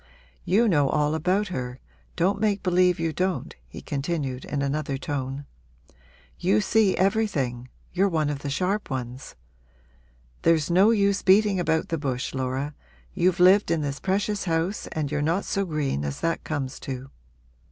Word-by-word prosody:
'You 220 +6 +3
know 145 -8 +3
all 150 0 +1
about 185 +6 0
her 125 -6 -5 0.4
don't 185 +4 +1
make 205 -2 +1
believe 180 -1 +3
you 165 -1 -1
don't,' 185 +3 -2
he - - -10
continued 140 -3 -3
in 140 -1 -2
another 140 0 -1
tone. 135 -1 -4 0.9
'You 105 - +3
see 210 - +2
everything 175 - 0 0.2
you're 195 +3 +2
one 155 -4 0
of 145 - -4
the 145 - -5
sharp 185 +8 -1
ones. 130 -1 -5 1.1
There's 165 -1 +2
no 190 +5 +5
use 200 -3 +2
beating 200 0 +4
about 160 -2 0
the 165 - -1
bush, 130 -3 -3
Laura 130 +2 -2 0.4
you've 180 -1 +1
lived 185 +2 +6
in 165 -2 +1
this 140 -1 -3
precious 200 +1 -1
house 165 +3 -1
and 150 -3 -2
you're 150 -1 0
not 165 +6 0
so 200 0 -1
green 150 - -2
as 70 -1 -4
that 165 0 -1
comes 140 -4 -4
to. 135 0 -6
160 Hz, 160 wpm, -25 LUFS, 140-190 Hz, 1.1 s, lived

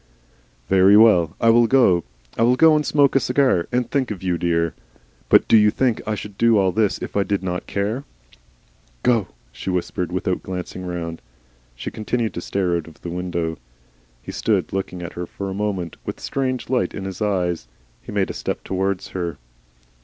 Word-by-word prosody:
"Very 95 +2 +6
well. 90 -8 +5
I 115 - +5
will 120 0 +5
go. 110 -10 +4 0.3
I - - -2
will 120 +2 +5
go 160 +3 +6
and 150 - +2
smoke 145 -2 +3
a - - +6
cigar. 125 -9 +2
And 125 -1 0
think 135 -3 0
of 100 -4 -6
you, 90 -2 +1
dear.... 85 -1 0 0.6
But - - +5
do - - +5
you 105 -1 +6
think 120 +1 0
I 110 - 0
should 105 0 -9
do 115 -1 +5
all 95 -2 +3
this 105 0 +1
if - - -7
I 100 - +3
did 100 -1 -1
not 90 -1 -3
care?" 105 +7 -2 1.0
"Go," 115 -5 +2 0.2
she - - -6
whispered, 90 0 -2
without 90 0 -1
glancing 90 0 -6
round. 85 -2 -5 0.5
She - - -6
continued 110 +1 -2
to 85 - -5
stare 90 -1 0
out 85 - -6
of 80 - -16
the 85 - -5
window. 85 -3 -3 0.6
He - - -6
stood - - 0
looking 95 -2 -3
at 85 - -7
her 90 0 -5
for 100 +2 -5
a - - -4
moment, 95 -4 -3
with - - -5
a - - -18
strange 130 -2 -2
light 125 0 0
in 95 - -5
his 95 +2 -6
eyes. 90 - -1 0.3
He - - -10
made - - 0
a - - -7
step - - -4
towards 95 0 -2
her. 85 -5 -4
95 Hz, 200 wpm, -22 LUFS, 90-115 Hz, 1.0 s, Very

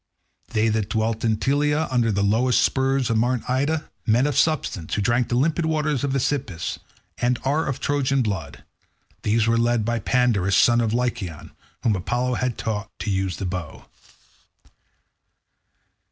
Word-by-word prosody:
They 110 +1 +2
that 110 -2 -1
dwelt 110 0 -1
in 110 -2 +2
Telea 150 +5 +1
under 120 -3 +2
the 100 0 0
lowest 115 +5 +3
spurs 135 -2 +1
of 110 - +2
Mt. 125 +1 0
Ida, 145 +5 -1 0.2
men 115 +4 +3
of 145 -3 -1
substance, 125 - 0
who 105 - 0
drink 120 +2 +1
the 120 - 0
limpid 160 +5 +1
waters 150 -4 0
of 140 - 0
the 135 - +1
Aesepus, 130 -10 -2 0.4
and 125 0 +1
are 145 +4 +1
of 135 - -2
Trojan 140 -2 +1
blood—these 105 +1 -4
were 115 0 +2
led 120 -2 +1
by 120 0 0
Pandarus 110 -5 +2
son 120 0 +5
of 115 -2 0
Lycaon, 110 -9 -3 0.3
whom 110 -3 +2
Apollo 120 +7 -1
had 125 -2 -1
taught 105 -1 -3
to 105 - -3
use 95 -2 -1
the 100 - -4
bow. 90 -4 -5
120 Hz, 160 wpm, -23 LUFS, 110-135 Hz, 0.4 s, son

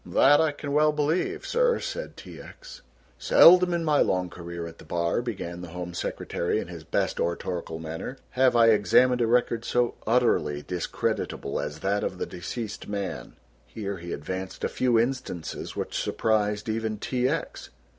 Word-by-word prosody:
"That 145 +3 +5
I 160 -1 +2
can 145 -1 -6
well 150 +1 +4
believe, 150 +4 -1
sir," 485 0 +2
said - - -5
T. - - -10
X. - - -12 0.4
"Seldom 180 - +7
in 170 -1 -1
my 150 -2 +3
long 90 -1 +1
career 85 -1 -7
at 85 0 -10
the - - -12
bar," 85 +5 0
began 95 -7 -5
the 90 - -7
Home 90 -1 -5
Secretary 85 +2 -2
in - - -6
his 85 -3 -8
best - - -1
oratorical 85 -1 -2
manner, 80 +11 -6
"have 130 -1 +3
I 115 -1 +6
examined 115 +4 +4
a 115 - +3
record 115 -1 +2
so 120 0 +1
utterly 90 -12 +2
discreditable 85 -5 -2
as 75 +1 -5
that 100 +2 0
of 90 - -3
the - - -2
deceased 105 +5 -6
man." 100 -2 -5 0.3
Here 100 - -5
he 85 0 -8
advanced 95 +6 -5
a - - +1
few 125 -2 +2
instances 120 -9 -3
which - - -4
surprised 105 0 0
even 110 -1 -2
T. 125 +4 0
X. - - -4
110 Hz, 170 wpm, -26 LUFS, 85-130 Hz, 0.4 s, Seldom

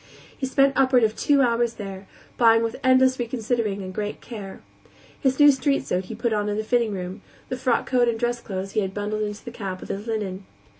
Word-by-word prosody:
He 265 - -3
spent 275 +1 +3
upward 260 -2 +4
of 220 0 +2
two 285 -1 +3
hours 235 -1 +1
there, 195 -2 -8 0.3
buying 225 -1 +5
with 230 - -2
endless 260 0 +4
reconsidering 230 -4 -1
and 185 0 -7
great 210 +1 -4
care. 205 -5 -9 0.6
His 265 0 +1
new 290 0 +9
street 275 +1 0
suit 185 +1 -1
he 225 - -7
put 235 0 -1
on 210 -1 0
in 205 - -2
the 215 - -1
fitting 235 0 +1
room; 185 +1 -5 0.3
the - - -2
frock 255 -2 +1
coat 245 -2 +2
and 230 -1 0
dress 240 0 -1
clothes 195 -1 -5
he - - 0
had 190 -2 -2
bundled 210 +1 -2
into 210 +1 -4
the 240 - -6
cab 195 -5 -5
with - - -10
his 205 +3 -5
linen. 200 -4 -3
225 Hz, 220 wpm, -24 LUFS, 205-250 Hz, 0.6 s, new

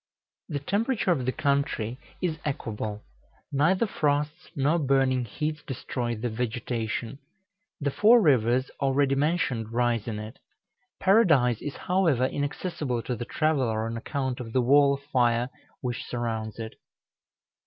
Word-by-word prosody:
The 145 - -2
temperature 205 - 0
of 130 -7 0
the - - +3
country 140 -5 -1 0.2
is 160 -3 -1
equable; 110 -6 -4 0.5
neither 170 +10 +3
frosts 150 -2 -1
nor 145 +4 +2
burning 135 -3 +2
heats 150 +6 -3
destroy 120 -3 -3
the 115 +3 -3
vegetation. 115 +1 -3 0.6
The 140 -2 -1
four 225 - +6
rivers 130 - +3
already 135 0 +2
mentioned 135 -6 0
rise 120 -2 +1
in 110 -2 -3
it. 110 +3 -8 0.6
Paradise 155 - +4
is, 145 - -5
however, 175 -9 +2
inaccessible 145 -3 -2
to 125 - -2
the 120 - -5
traveller 130 -8 0
on 115 0 -3
account 130 +2 -3
of 115 -3 -7
the 130 - +3
wall 140 +2 +5
of 140 - -12
fire 125 -3 +1 0.3
which 125 -2 -3
surrounds 110 -3 -3
it. 110 -1 -6
130 Hz, 135 wpm, -27 LUFS, 120-150 Hz, 0.6 s, four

